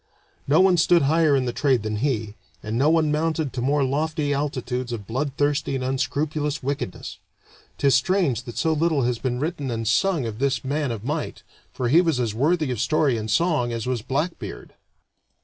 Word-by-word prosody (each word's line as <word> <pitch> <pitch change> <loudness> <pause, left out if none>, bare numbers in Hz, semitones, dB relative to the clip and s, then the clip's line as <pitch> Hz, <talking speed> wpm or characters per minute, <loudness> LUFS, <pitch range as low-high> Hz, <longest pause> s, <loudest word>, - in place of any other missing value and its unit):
No 150 +5 +4
one 190 -2 +4
stood 170 0 +4
higher 155 +1 +3
in 130 -2 +1
the 120 - -2
trade 130 -6 +1
than 110 0 -2
he, 110 -4 -1 0.3
and 110 +1 -4
no 140 +6 +3
one 160 -2 +3
mounted 155 -1 -1
to 125 - -3
more 140 +3 +2
lofty 150 +2 -1
altitudes 130 -3 -3
of 110 -4 -5
bloodthirsty 140 +4 -1
and 130 - -2
unscrupulous 145 +3 -2
wickedness. 140 -9 -4 0.6
'Tis 140 -1 +3
strange 135 - +2
that 120 - -8
so 160 - +1
little 155 -3 +1
has 120 -1 0
been 125 -2 -2
written 150 -2 -3
and 115 -2 -3
sung 165 - +2
of 110 -1 -5
this 135 -1 0
man 145 +1 -1
of 115 -3 -5
might, 150 +3 -3 0.3
for 125 - -2
he 160 +8 +5
was 165 -7 0
as 115 -4 -1
worthy 150 +4 +1
of 120 -3 -2
story 150 -2 +2
and 110 -1 -4
of - - +1
song 155 -8 +1
as 115 -2 -3
was 125 -3 -1
Blackbeard. 145 +9 -4
140 Hz, 195 wpm, -23 LUFS, 125-155 Hz, 0.6 s, he